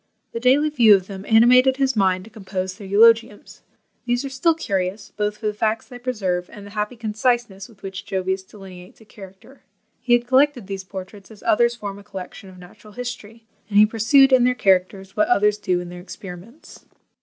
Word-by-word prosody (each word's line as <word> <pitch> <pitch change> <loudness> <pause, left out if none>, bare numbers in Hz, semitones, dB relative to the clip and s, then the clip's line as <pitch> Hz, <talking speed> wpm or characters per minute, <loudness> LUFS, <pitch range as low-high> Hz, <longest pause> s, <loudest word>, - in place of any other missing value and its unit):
The 230 - -5
daily 275 +5 +3
view 230 -7 +6
of 190 -2 -2
them 195 0 -9
animated 250 +4 +5
his 270 -2 0
mind 185 -3 +1
to 225 - -15
compose 190 -3 -5
their 200 0 -11
eulogiums. 225 +1 +2 0.4
These 245 +2 -1
are - - -4
still 315 +5 +1
curious, 195 - -3
both 210 0 -2
for 220 - -10
the 210 - 0
facts 220 +1 -1
they 245 -2 -11
preserve, 195 -8 -3
and 205 -1 -11
the 205 - -12
happy 210 +3 -3
conciseness 220 -2 -2
with 215 -4 -21
which 190 -1 -7
Jovius 190 0 -2
delineates 190 -2 -14
a 220 - -18
character. 195 +6 -15 0.4
He 245 0 0
had 240 0 +3
collected 260 -2 +2
these 195 0 -6
portraits 190 +1 -10
as 215 -2 -15
others 235 +2 +2
form 200 -3 -7
a - - -14
collection 195 -1 -10
of 185 - -15
natural 180 +4 -16
history; 230 -2 -8 0.2
and 205 - 0
he 210 - +8
pursued 260 +5 +4
in 255 -2 +5
their 250 0 +2
characters 190 -1 0
what 210 - +2
others 210 -2 +2
do 180 -3 0
in 175 0 -7
their 175 0 -9
experiments. 195 - -12
210 Hz, 200 wpm, -21 LUFS, 190-240 Hz, 0.4 s, he